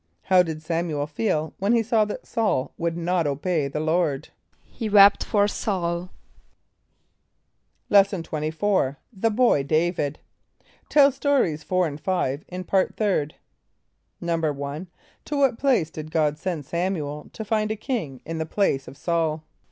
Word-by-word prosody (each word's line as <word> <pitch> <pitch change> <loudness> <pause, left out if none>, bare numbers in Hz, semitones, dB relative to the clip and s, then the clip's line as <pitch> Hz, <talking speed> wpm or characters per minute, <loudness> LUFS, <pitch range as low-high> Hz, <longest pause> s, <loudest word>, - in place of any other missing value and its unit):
= - - -47
How 185 -1 +8
did 160 -3 -3
S[)a]m´u 165 +1 -2
el 145 - 0
feel 155 0 -1
when 200 +4 +2
he 230 -1 +3
saw 220 -1 +2
that 210 - -6
S[a:]ul 205 - 0
would 170 0 -2
not 170 -1 0
obey 145 +2 0
the 140 +2 -4
Lord? 155 -2 0 0.4
=He 225 -3 -5
wept 200 -1 +7
for 205 -2 +2
S[a:]ul.= 180 -4 -2 1.8
Lesson 195 -3 +4
XXIV. 155 0 0 0.2
The 225 +3 +1
Boy 230 - +3
David. 155 0 0 0.7
(Tell 285 -1 +6
Stories 265 - +1
4 185 +1 +1
and 150 -2 -5
5 155 -7 -1
in 180 +1 -6
Part 190 +1 0
Third.) 190 -9 0 0.8
=1.= 155 -1 -2 0.4
To 295 - -3
what 270 -5 +2
place 250 - +2
did 155 0 -7
God 155 -2 +1
send 170 -4 -3
S[)a]m´u 175 +6 -1
el 150 +1 -7
to 220 - -6
find 215 0 0
a 215 - -1
king 205 - -4
in 165 0 -4
the 160 - -2
place 155 -8 0
of - - -10
S[a:]ul? 160 0 -1
170 Hz, 155 wpm, -24 LUFS, 155-205 Hz, 1.8 s, How